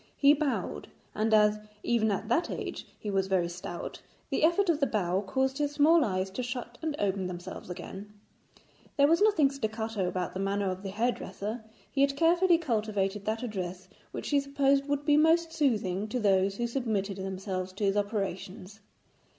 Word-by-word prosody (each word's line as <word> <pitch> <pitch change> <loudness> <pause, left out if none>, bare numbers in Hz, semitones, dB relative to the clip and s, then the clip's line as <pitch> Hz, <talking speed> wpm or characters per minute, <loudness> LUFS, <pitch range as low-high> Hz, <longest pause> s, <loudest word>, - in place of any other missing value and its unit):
He 285 0 +6
bowed, 295 -2 -2 0.3
and 220 +1 0
as 210 -1 +5 0.2
even 230 -2 +2
at 205 +1 -2
that 245 +9 +1
age - - -5
he 210 - -4
was 195 -1 +1
very 185 -3 +1
stout, 175 0 -7 0.3
the - - 0
effort 345 +5 +4
of 330 -3 +2
the 280 - +2
bow 185 -3 0
caused 265 +7 -1
his 290 0 0
small 310 +3 +5
eyes 190 -3 -1
to 225 - -3
shut 245 -1 -5
and 315 -2 -2
open 195 -2 0
themselves 180 +1 -7
again. 190 +3 -8 0.9
There 280 - +6
was 330 +5 +3
nothing 360 -10 +4
staccato 220 -6 -2
about 180 -1 -2
the 190 - -4
manner 195 0 0
of 185 +1 -6
the 195 - -5
hairdresser, 220 0 -3 0.3
he 275 - 0
had 275 0 +2
carefully 340 +2 +4
cultivated 210 - -1
that 220 +2 -2
address 185 -5 -5 0.2
which - - -5
he 285 - +4
supposed 275 0 +1
would 285 0 -1
be 295 -1 +5
most 325 +1 +3
soothing 215 - 0
to 250 +3 -2
those 195 -2 +2
who 240 - -1
submitted 220 -6 -2
themselves 190 -1 -4
to 200 - -5
his 195 0 +2
operations. 200 -1 -3
215 Hz, 180 wpm, -29 LUFS, 195-280 Hz, 0.9 s, He